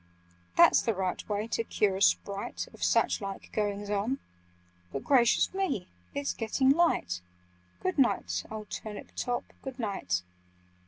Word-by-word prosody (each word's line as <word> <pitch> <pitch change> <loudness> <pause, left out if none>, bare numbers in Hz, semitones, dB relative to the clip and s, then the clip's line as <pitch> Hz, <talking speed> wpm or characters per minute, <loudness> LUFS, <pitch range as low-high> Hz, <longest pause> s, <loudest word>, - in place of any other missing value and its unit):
"That's - - +7
the 225 - 0
right 185 +1 -2
way 205 +1 0
to 230 - 0
cure 205 -3 +1
a - - -6
Sprite 195 - +1
Of - - -7
such - - +3
like 195 -1 -6
goings 205 -1 -1
on— 210 +6 0 0.7
But 135 - -4
gracious 245 +1 +4
me! 380 - -1 0.3
It's 140 0 -1
getting 260 +4 +2
light! 275 - +2 0.6
Good 185 - -1
night, 90 - +2
old 215 -1 -7
Turnip 210 -2 -6
top, 245 -1 -1 0.2
good 265 -2 -7
night!" 190 - -1
205 Hz, 145 wpm, -30 LUFS, 190-245 Hz, 0.7 s, That's